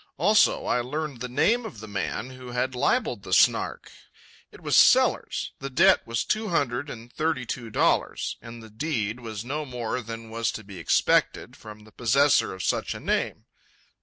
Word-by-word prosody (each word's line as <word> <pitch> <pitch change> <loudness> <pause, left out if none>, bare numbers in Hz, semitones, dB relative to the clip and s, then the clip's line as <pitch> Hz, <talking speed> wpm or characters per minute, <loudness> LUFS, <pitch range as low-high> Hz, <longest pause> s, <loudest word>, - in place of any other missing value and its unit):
Also, 200 +7 +3
I - - +1
learned 145 +1 -4
the 125 - -4
name 225 - +2
of 200 - -8
the 110 - -9
man 105 +5 -4
who 130 -1 -10
had 130 +2 -1
libelled 125 - 0
the - - -5
Snark. - - +2 0.6
It - - -14
was - - 0
Sellers; - - +4
the 135 - -5
debt 175 +8 +5
was 115 0 -1
two 215 0 -1
hundred 140 -4 -1
and 115 0 -10
thirty 155 -4 -1
two 120 -1 -5
dollars; - - 0
and 115 0 -10
the 110 - -13
deed 115 -3 -2
was 110 -2 -7
no 150 +4 -3
more 125 -2 -4
than 115 0 -8
was 115 0 -1
to 110 - -7
be 100 -3 -10
expected 80 - +1
from 105 0 -12
the 110 - -17
possessor 135 +6 +3
of 95 - -6
such - - -1
a - - -7
name. - - -2
125 Hz, 185 wpm, -26 LUFS, 115-145 Hz, 0.6 s, debt